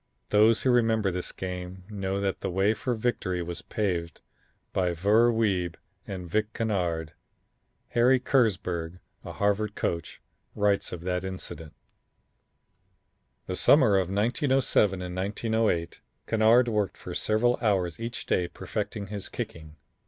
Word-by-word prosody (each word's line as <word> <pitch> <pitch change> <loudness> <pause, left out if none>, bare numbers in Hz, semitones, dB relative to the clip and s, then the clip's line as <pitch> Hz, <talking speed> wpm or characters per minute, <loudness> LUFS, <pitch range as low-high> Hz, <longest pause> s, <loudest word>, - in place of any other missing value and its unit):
Those 110 +2 +4
who 130 - +4
remember 110 -4 +2
this 90 0 -3
game 90 0 -6
know 100 -2 -3
that 100 -1 -2
the - - -2
way 95 +4 +2
for 125 +2 -2
victory 95 -6 -1
was 85 0 -6
paved 90 -7 -2 0.5
by 90 -2 +1
Ver 105 +7 +4
Wiebe 95 -7 0 0.3
and 90 -2 -6
Vic 110 +5 -1
Kennard. 85 -8 -1 0.8
Harry 125 +2 +4
Kersburg, 90 -10 0 0.3
a - - -7
Harvard 105 +1 0
coach, 85 -1 -3 0.4
writes 100 -1 +1
of 90 - -6
that 90 +1 -2
incident: 90 -4 -6 1.7
"The 90 - -3
summer 130 0 +6
of 90 -2 -1
1907 110 - +2
and 90 0 -5
1908, 100 -2 -1 0.2
Kennard 115 +3 +4
worked 105 -4 -1
for - - -8
several 120 +3 +1
hours 95 -7 +1
each 115 +1 -5
day 90 - +1
perfecting 100 +3 -4
his 100 0 -6
kicking. 80 -2 -7
100 Hz, 130 wpm, -27 LUFS, 90-110 Hz, 1.7 s, summer